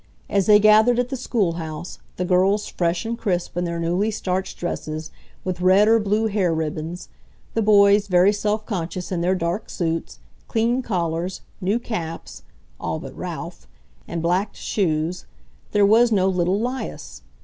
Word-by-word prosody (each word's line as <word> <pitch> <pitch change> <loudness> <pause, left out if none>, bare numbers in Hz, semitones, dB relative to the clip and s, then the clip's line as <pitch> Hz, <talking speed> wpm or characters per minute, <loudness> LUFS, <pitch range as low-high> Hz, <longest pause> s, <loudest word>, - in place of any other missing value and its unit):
As 195 -2 +2
they 210 -1 +8
gathered 215 +3 +5
at 245 0 0
the 270 - -3
schoolhouse, 175 -10 -3 0.2
the 180 - -2
girls 190 +3 +2
fresh 170 +1 -1
and 230 +1 -2
crisp 185 -8 -2
in 175 0 -1
their 170 0 -3
newly 175 +6 0
starched 190 -3 -3
dresses, 155 -2 -4 0.3
with 180 -1 -3
red 190 +3 +5
or 225 +1 +5
blue 210 +1 +1
hair 200 -5 +1
ribbons, 160 +2 -4 0.4
the 225 - +1
boys 205 -1 +5
very 185 +2 +4
self 210 +1 -1
conscious 180 -3 -4
in 175 -2 -1
their 180 +2 +2
dark 175 +3 -2
suits, 165 -2 -3 0.3
clean 235 +2 +1
collars, 175 -4 -2 0.2
new 195 +5 +1
caps 175 -9 -6 0.4
(all - - -2
but - - -9
Ralph), - - -7 0.4
and 170 -1 -4
blacked 185 +5 0
shoes, 170 -2 -1 0.4
there 205 -1 +4
was 230 +3 +5
no 190 -3 +3
little 185 +1 +1
'Lias. 220 - -5
190 Hz, 160 wpm, -22 LUFS, 170-215 Hz, 0.4 s, they